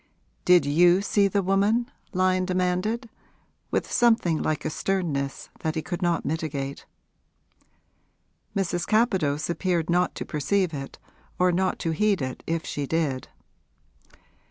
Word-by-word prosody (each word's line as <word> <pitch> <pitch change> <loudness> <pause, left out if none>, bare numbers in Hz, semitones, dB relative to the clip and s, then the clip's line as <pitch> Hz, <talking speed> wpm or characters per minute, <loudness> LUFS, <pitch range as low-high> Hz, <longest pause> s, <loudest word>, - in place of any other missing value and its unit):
'Did 180 -3 +6
you 175 +5 +5
see 200 0 +2
the 200 0 0
woman?' 200 +5 +2 0.3
Lyon 185 -1 +2
demanded, 185 +6 0 0.6
with - - -1
something 225 -9 +3
like 155 -1 -1
a - - +1
sternness 150 -8 -2
that 160 0 -2
he 160 - -2
could 175 +1 -4
not 175 -2 0
mitigate. 140 -3 -3 1.7
Mrs. 175 -3 -1
Capadose 190 -10 +2
appeared 175 -1 0
not 180 +1 +2
to - - -5
perceive 180 +4 0
it 135 -1 -6 0.4
or 180 0 +3
not 185 +1 0
to 165 - -2
heed 200 +4 +2
it 130 -2 -4
if 165 0 -1
she 145 -1 -3
did. 150 -5 -1
175 Hz, 130 wpm, -25 LUFS, 155-195 Hz, 1.7 s, Did